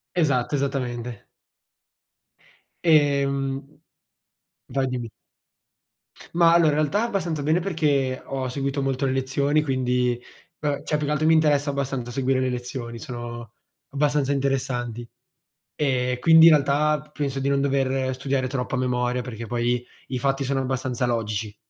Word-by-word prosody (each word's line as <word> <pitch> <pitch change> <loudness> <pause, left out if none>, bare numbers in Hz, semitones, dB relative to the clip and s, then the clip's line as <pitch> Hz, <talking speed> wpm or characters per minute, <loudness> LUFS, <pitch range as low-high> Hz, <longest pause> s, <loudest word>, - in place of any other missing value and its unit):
Esatto, 145 -6 +1
esattamente. 125 -4 -3 1.6
Ehm 140 -3 +2 1.0
Vai, 135 +1 +1
dimmi. 125 -3 -4 1.2
Ma 170 -1 +5
allora, 170 -2 +5
in 145 - 0
realtà 155 +7 +1
abbastanza 180 -10 -2
bene 155 +4 +2
perché 145 -8 0
ho 135 -1 -3
seguito 140 +2 -2
molto 135 0 -1
le 135 - +1
lezioni 140 +3 +1
quindi 125 -3 0 0.4
beh, 145 -1 -2
cioè 150 - 0
più 150 -1 -2
che 150 - 0
altro 155 +1 +1
mi 160 - +5
interessa 150 -2 +3
abbastanza 135 -3 -3
seguire 130 +1 +1
le 130 0 0
lezioni, 120 -1 -5
sono 120 -1 -7 0.4
abbastanza 145 0 +1
interessanti. 130 -4 -1 0.7
Ehm, 125 -3 0
quindi 160 +3 +8
in - - +7
realtà 150 +1 +3
p 150 +1 -20
penso 140 -2 -2
di 135 - 0
non 140 0 +2
dover 135 -1 0
studiare 135 0 -1
troppo 130 0 -3
a - - 0
memoria, 125 0 0
perché 115 -2 -7
poi 120 +2 0 0.3
i 130 - -2
fatti 135 +1 0
sono 135 0 0
abbastanza 130 -1 -1
logici. 110 -3 -2
135 Hz, 145 wpm, -24 LUFS, 125-145 Hz, 1.6 s, quindi